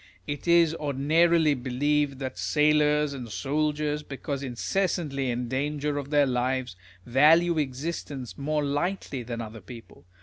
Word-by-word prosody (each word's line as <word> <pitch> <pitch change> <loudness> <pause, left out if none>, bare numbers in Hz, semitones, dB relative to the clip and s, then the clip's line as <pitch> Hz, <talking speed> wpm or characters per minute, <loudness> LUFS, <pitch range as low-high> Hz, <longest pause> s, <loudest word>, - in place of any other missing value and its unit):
It 145 +3 -5
is 170 -2 +5
ordinarily 155 +2 +2
believed 140 +2 0
that 130 -1 -5
sailors 150 -1 +2
and 125 -4 -7
soldiers, 150 +3 -1
because 140 -1 -5
incessantly 140 +1 -1
in 120 0 -2
danger 145 +3 -2
of 140 -1 -7
their 145 -1 +4
lives, 130 -3 -1 0.3
value 160 +6 +4
existence 140 -2 -4
more 150 +1 -1
lightly 145 -1 -2
than 115 0 -5
other 110 -1 -8
people. 115 -2 -13
145 Hz, 130 wpm, -27 LUFS, 130-150 Hz, 0.3 s, is